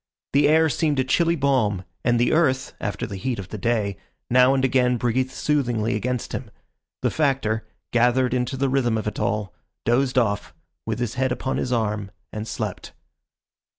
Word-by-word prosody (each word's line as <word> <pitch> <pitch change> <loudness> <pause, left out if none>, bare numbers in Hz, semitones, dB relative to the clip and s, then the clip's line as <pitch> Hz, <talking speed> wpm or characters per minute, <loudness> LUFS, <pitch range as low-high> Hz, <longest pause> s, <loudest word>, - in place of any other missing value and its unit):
The 145 +1 +5
air 160 +2 +5
seemed 150 0 0
a 130 - +3
chilly 170 +6 +2
balm, 125 - +1 0.2
and 120 0 +2
the 120 - +3
earth, 135 -6 +2
after 105 - -2
the 100 -3 -6
heat 120 +6 -2
of 95 -2 -7
the 110 - -5
day, 105 -3 0 0.3
now 125 +2 +6
and 130 -1 +2
again 125 -1 +3
breathed 125 +2 0
soothingly 125 -6 0
against 125 +3 -2
him. - - -5 0.5
The - - +2
Factor, 135 -7 0 0.3
gathered 125 +1 +3
into 125 +1 -1
the 135 +1 +1
rhythm 125 -4 +1
of 110 - -3
it 105 - -3
all, 105 -2 -1 0.3
dozed 125 +3 +2
off, 105 -5 0 0.3
with - - -1
his 120 -2 -2
head 130 0 0
upon 130 +1 -2
his 125 - -2
arm, 105 -4 -1 0.2
and 110 +1 -4
slept. - - -5
125 Hz, 180 wpm, -23 LUFS, 110-135 Hz, 0.5 s, now